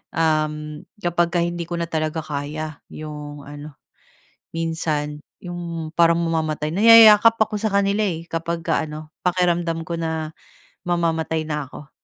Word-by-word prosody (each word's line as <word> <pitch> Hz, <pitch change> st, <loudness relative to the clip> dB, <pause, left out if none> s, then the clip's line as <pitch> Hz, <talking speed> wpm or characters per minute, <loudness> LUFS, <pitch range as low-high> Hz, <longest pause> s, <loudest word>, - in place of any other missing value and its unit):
Uhm, 155 Hz, -1 st, -1 dB, 0.2 s
kapag 175 Hz, 0 st, +2 dB
ka 175 Hz, -, +1 dB
hindi 175 Hz, 0 st, -2 dB
ko 175 Hz, -, -3 dB
na 170 Hz, -, -2 dB
talaga 155 Hz, 0 st, -1 dB
kaya 150 Hz, +1 st, -5 dB
'yong 150 Hz, -1 st, -8 dB
ano. 145 Hz, 0 st, -9 dB, 0.8 s
Minsan 160 Hz, -3 st, -2 dB, 0.3 s
'yong 170 Hz, -2 st, -6 dB
parang 170 Hz, 0 st, +5 dB
mamamatay, 155 Hz, -2 st, -1 dB
nayayakap 225 Hz, +2 st, +8 dB
ako 215 Hz, 0 st, +1 dB
sa 220 Hz, -, +1 dB
kanila, 200 Hz, +1 st, +1 dB
eh, 165 Hz, -3 st, -3 dB
kapag 165 Hz, 0 st, -3 dB
ka 160 Hz, -, +1 dB
ano, 155 Hz, 0 st, -9 dB
pakiramdam 175 Hz, -2 st, 0 dB
ko 170 Hz, 0 st, -4 dB
na, 160 Hz, -1 st, -3 dB, 0.5 s
mamamatay 165 Hz, -2 st, 0 dB
na 150 Hz, -2 st, -3 dB
ako. 150 Hz, +3 st, -12 dB
165 Hz, 140 wpm, -22 LUFS, 155-175 Hz, 0.8 s, nayayakap